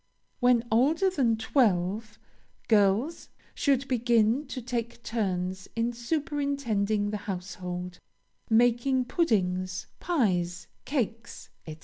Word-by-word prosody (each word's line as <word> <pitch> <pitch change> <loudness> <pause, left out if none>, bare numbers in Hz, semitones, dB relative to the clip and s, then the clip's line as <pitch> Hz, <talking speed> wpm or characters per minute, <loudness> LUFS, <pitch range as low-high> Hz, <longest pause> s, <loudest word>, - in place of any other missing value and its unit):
When 245 -2 +3
older 310 - +3
than 245 -10 +2
twelve, 215 -3 +1 0.5
girls 215 - +2 0.2
should 275 -1 +1
begin 240 +2 +2
to 260 - -5
take 235 -1 -4
turns 190 -5 -2
in 230 +1 0
superintending 240 -7 -1
the 210 - -2
household 180 -1 -5 0.5
making 245 +3 +3
puddings, 185 - 0
pies, 180 - 0 0.2
cakes, 240 -4 -3 0.2
&c. 155 -1 -7
230 Hz, 95 wpm, -28 LUFS, 195-255 Hz, 0.5 s, When